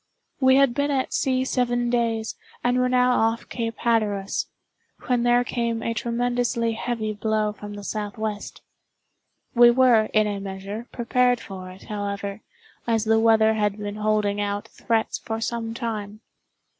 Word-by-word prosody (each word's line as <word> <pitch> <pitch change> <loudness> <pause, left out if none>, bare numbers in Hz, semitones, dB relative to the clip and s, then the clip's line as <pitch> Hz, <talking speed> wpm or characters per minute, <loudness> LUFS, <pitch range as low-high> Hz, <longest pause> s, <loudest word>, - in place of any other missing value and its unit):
We 260 -1 +5
had 275 -3 +4
been 285 +3 0
at 270 -2 -1
sea 260 -1 +1
seven 245 -2 0
days, 230 -2 0 0.3
and 245 +1 +2
were 250 0 +2
now 250 0 +4
off 225 +1 0
Cape 230 -2 -3
Hatteras, 210 -4 0 0.6
when 245 -2 +1
there 240 0 +4
came 235 -1 -2
a 230 - -1
tremendously 240 0 0
heavy 225 -1 -2
blow 215 0 0
from 205 0 -9
the 205 - -8
southwest. 210 0 -4 0.9
We 240 0 +8
were, 240 -3 +5
in 215 0 +2
a 205 -1 -2
measure, 195 +4 -6
prepared 245 0 +2
for 185 -4 -8
it, 185 +1 -13
however, 200 0 -4 0.5
as 225 -2 +1
the 220 0 +4
weather 220 -1 +4
had 210 -2 0
been 205 0 -5
holding 210 -1 +1
out 205 0 -3
threats 225 -1 -1
for 225 0 -4
some 225 0 -3
time. 215 -2 -4
225 Hz, 155 wpm, -24 LUFS, 210-240 Hz, 0.9 s, We